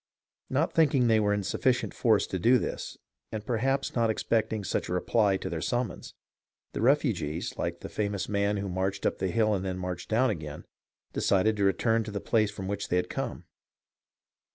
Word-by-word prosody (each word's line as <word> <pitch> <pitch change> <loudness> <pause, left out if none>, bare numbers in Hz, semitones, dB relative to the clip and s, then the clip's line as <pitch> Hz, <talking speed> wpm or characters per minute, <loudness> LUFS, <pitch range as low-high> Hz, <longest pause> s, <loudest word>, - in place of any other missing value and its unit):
Not 145 +6 +1
thinking 140 -6 +4
they 110 -2 +4
were 105 -1 +2
in 105 -1 0
sufficient 125 +6 0
force 110 -4 +3
to 95 - -4
do 120 +8 +5
this, - - -4 0.3
and 110 -1 -5
perhaps 130 +4 0
not 115 -2 +2
expecting 110 -1 0
such - - -2
a - - -1
reply 100 +2 +2
to - - -5
their 80 -2 -3
summons, 120 -6 -3 0.6
the - - -3
refugees, 115 - +1
like - - -3
the - - -5
famous 100 -2 -2
man 100 0 +1
who 100 0 -3
marched 95 +2 -2
up - - 0
the 95 - 0
hill 110 +1 +2
and 95 -2 -1
then 95 -1 -3
marched 90 -1 -5
down 115 +2 +3
again, 75 -6 -6 0.5
decided 100 +3 +2
to 100 - +1
return 110 +4 +2
to - - -5
the 100 - -3
place 110 0 +2
from 100 -2 -6
which 100 0 -3
they - - 0
had 90 - 0
come. - - -4
105 Hz, 195 wpm, -28 LUFS, 95-115 Hz, 0.6 s, do